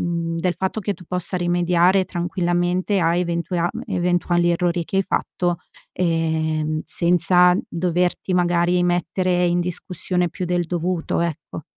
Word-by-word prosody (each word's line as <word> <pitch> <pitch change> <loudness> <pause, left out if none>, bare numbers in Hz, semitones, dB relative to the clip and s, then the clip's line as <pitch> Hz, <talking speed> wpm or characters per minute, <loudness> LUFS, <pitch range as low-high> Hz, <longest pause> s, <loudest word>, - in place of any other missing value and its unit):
mhmm, 170 -1 -2
del 175 0 0
fatto 190 +3 -2
che 205 0 -1
tu 180 - -15
possa 180 +1 -3
rimediare 175 +1 +2
tranquillamente 175 +2 0
a 170 0 +2
eventuea 170 0 -1 0.2
eventuali 175 0 +1
errori 175 0 0
che 190 - -4
hai - - +3
fatto, 175 -2 -1 0.3
ehm, 160 -2 0
senza 180 +1 +3
doverti 180 +1 -1
magari 175 0 +2
mettere 180 +1 +1
in 175 0 +1
discussione 180 0 -2
più 180 +3 -5
del 175 0 0
dovuto, 175 0 -1
ecco. 165 -2 -4
175 Hz, 135 wpm, -21 LUFS, 170-180 Hz, 0.3 s, hai